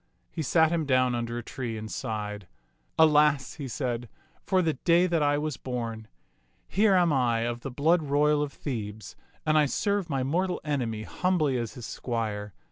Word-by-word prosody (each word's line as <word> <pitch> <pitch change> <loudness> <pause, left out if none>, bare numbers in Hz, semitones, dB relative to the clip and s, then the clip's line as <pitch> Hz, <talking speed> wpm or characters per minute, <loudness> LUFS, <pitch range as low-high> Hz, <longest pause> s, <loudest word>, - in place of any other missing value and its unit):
He 165 - -4
sat 160 +2 +3
him 165 -3 0
down 130 -2 +3
under 120 0 -2
a 120 - -4
tree 115 -2 -5
and 110 0 -7
sighed. 105 -5 -4 0.5
Alas," 150 -3 +4
he 135 - -4
said, 120 -2 -3 0.3
"for 185 -1 +2
the 160 -2 +1
day 170 +6 +3
that 170 -3 +1
I 145 0 +3
was 150 -2 -2
born. 115 -3 -5 0.6
Here 200 0 +3
am 175 -4 +4
I 120 -4 +2
of 120 +1 -2
the 135 - -6
blood 160 +7 +2
royal 150 0 +2
of 145 -1 -2
Thebes, 110 - -6 0.3
and 155 0 +4
I 150 - +4
serve 200 +4 0
my 135 -3 0
mortal 180 +7 0
enemy 120 -8 -2
humbly 165 -2 0
as 120 -2 -2
his 120 -3 -7
squire. 105 -6 -4
135 Hz, 180 wpm, -27 LUFS, 115-155 Hz, 0.6 s, Alas